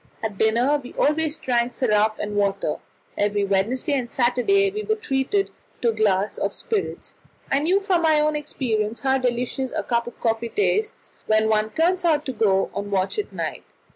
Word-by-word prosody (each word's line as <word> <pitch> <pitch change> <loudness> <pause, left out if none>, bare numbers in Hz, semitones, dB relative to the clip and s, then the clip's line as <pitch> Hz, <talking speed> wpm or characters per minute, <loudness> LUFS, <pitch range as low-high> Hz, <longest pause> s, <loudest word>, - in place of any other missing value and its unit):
At 210 -3 -4
dinner 245 +7 +3
we 250 - -10
always 305 +1 +1
drank 240 -1 0
syrup 215 -3 +2
and 210 0 -4
water; 200 -6 0 0.4
every 205 0 +1
Wednesday 205 +9 0
and 255 -4 -1
Saturday 265 +13 +2
we 425 +2 -4
were 435 0 0
treated 390 0 -1 0.3
to 235 - +4
a - - -6
glass 205 -2 +1
of - - -2
spirits. 430 -3 -3 0.4
I 275 - +4
knew 350 +7 +2
from 380 -4 +1
my 315 -2 +4
own 305 0 +1
experience 230 -7 -2
how 265 0 +2
delicious 250 +1 -1
a - - -2
cup 235 -1 0
of 240 - -9
coffee 230 0 0
tastes 425 - -1 0.2
when 215 0 +3
one 215 0 +2
turns 350 +7 +1
out 305 -3 +2
to 260 - -3
go 195 -4 +2
on 200 0 -4
watch 195 - 0
at 415 - -4
night. - - -6
245 Hz, 185 wpm, -23 LUFS, 215-305 Hz, 0.4 s, to